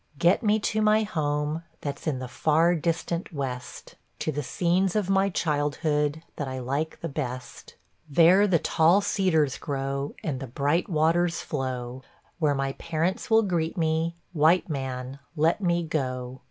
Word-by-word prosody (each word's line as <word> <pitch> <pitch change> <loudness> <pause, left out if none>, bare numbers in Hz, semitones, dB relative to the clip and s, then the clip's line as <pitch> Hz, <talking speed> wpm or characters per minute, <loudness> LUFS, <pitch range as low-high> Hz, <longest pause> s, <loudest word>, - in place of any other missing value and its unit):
Get 175 - +3
me 215 -1 +3
to 215 +1 0
my 215 +1 +4
home, 150 -4 -1 0.2
that's 140 +1 -5
in 145 -4 0
the 130 0 -5
far 160 +6 +2
distant 170 +2 -2
west, 130 -5 -6 0.2
To 155 - -2
the 145 0 -2
scenes 180 +6 +1
of 200 -3 +1
my 195 0 +3
childhood, 150 -1 0
that 145 - -3
I 130 0 -4
like 140 +5 -3
the 165 - -2
best; 130 -4 -6 0.3
There 175 +7 +6
the 180 -4 +4
tall 165 +5 +3
cedars 160 -9 +1
grow, 140 -1 -3
and 140 -5 -2
the 135 - -6
bright 145 - 0
waters 170 +1 +2
flow, 130 -3 -4 0.4
Where 150 -3 +2
my 135 0 -1
parents 170 +3 -2
will 225 0 +5
greet 170 -4 -1
me, 160 0 0 0.2
white 165 +3 +4
man, 135 -3 -4 0.2
let 165 +5 +2
me 175 -2 +1
go! 130 -5 -3
155 Hz, 155 wpm, -26 LUFS, 140-175 Hz, 0.4 s, There